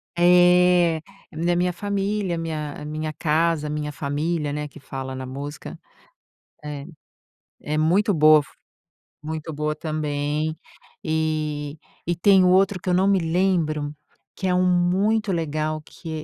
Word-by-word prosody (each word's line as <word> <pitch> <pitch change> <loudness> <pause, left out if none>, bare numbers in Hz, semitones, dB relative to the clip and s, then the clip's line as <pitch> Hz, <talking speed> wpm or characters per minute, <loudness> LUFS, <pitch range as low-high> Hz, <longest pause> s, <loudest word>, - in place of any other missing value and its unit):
É, 175 -1 +5 0.3
na 175 +2 0
minha 180 0 +1
família, 200 -1 -2
minha 155 -3 -4
minha 155 +1 -4
casa, 155 0 +1
minha 150 0 -3
família, 150 +2 -2
né, 150 0 -3
que 150 - -14
fala 130 -1 -6
na 130 - -5
música. 140 +3 -7 0.9
É. 145 -1 -6 0.8
É 150 +1 -2
muito 190 +7 +3
boa, 155 -2 +6 0.8
muito 160 +1 -5
boa 150 +1 -2
também, 155 0 -2 0.5
eh, 155 -2 -2 0.3
e 175 0 -1
tem 195 -1 +6
o 180 - +4
outro 190 +1 +3
que 185 - -6
eu 180 - +3
não 185 +2 +3
me 195 -2 +3
lembro 160 -4 0 0.4
que 190 - -4
é - - +2
um 180 - +3
muito 190 +5 +2
legal 155 -1 -2
que 160 0 -7
160 Hz, 135 wpm, -23 LUFS, 150-180 Hz, 0.9 s, boa